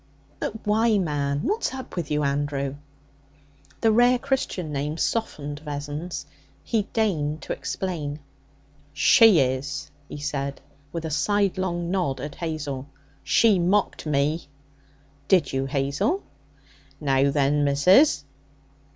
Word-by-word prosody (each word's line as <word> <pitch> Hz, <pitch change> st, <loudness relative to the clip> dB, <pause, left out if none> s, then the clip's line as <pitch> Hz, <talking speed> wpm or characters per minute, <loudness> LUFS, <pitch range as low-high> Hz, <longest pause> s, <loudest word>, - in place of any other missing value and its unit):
'But 220 Hz, -, -5 dB
why, 220 Hz, +1 st, +3 dB
man? 145 Hz, -5 st, -1 dB
What's 425 Hz, -, -1 dB
up 260 Hz, -, -8 dB
with 170 Hz, -5 st, -3 dB
you, 150 Hz, 0 st, 0 dB
Andrew?' 140 Hz, -1 st, -1 dB, 1.1 s
The 225 Hz, -, +4 dB
rare 245 Hz, +3 st, +5 dB
Christian 220 Hz, -, -2 dB
name 145 Hz, +2 st, -2 dB
softened 150 Hz, -10 st, -2 dB
Vessons. 150 Hz, +2 st, -5 dB, 0.4 s
He 220 Hz, -4 st, 0 dB
deigned 160 Hz, -9 st, 0 dB
to -, -, -3 dB
explain. 155 Hz, -6 st, -4 dB, 0.7 s
'She 220 Hz, -, +6 dB
is,' 140 Hz, +2 st, -1 dB, 0.2 s
he -, -, -7 dB
said, 140 Hz, -1 st, -3 dB, 0.3 s
with 165 Hz, 0 st, -4 dB
a 160 Hz, -, -3 dB
sidelong 180 Hz, +1 st, 0 dB
nod 175 Hz, -9 st, 0 dB
at 145 Hz, +2 st, -5 dB
Hazel. 145 Hz, -5 st, -4 dB, 0.4 s
'She 215 Hz, -5 st, +4 dB
mocked 185 Hz, -1 st, +1 dB
me.' 150 Hz, +2 st, 0 dB, 0.8 s
'Did 170 Hz, -9 st, +3 dB
you, 135 Hz, 0 st, 0 dB
Hazel?' 140 Hz, -, 0 dB, 0.8 s
'Now 135 Hz, -1 st, +2 dB
then, 145 Hz, +1 st, +2 dB
missus!' 145 Hz, -, +4 dB
150 Hz, 115 wpm, -25 LUFS, 140-190 Hz, 1.1 s, She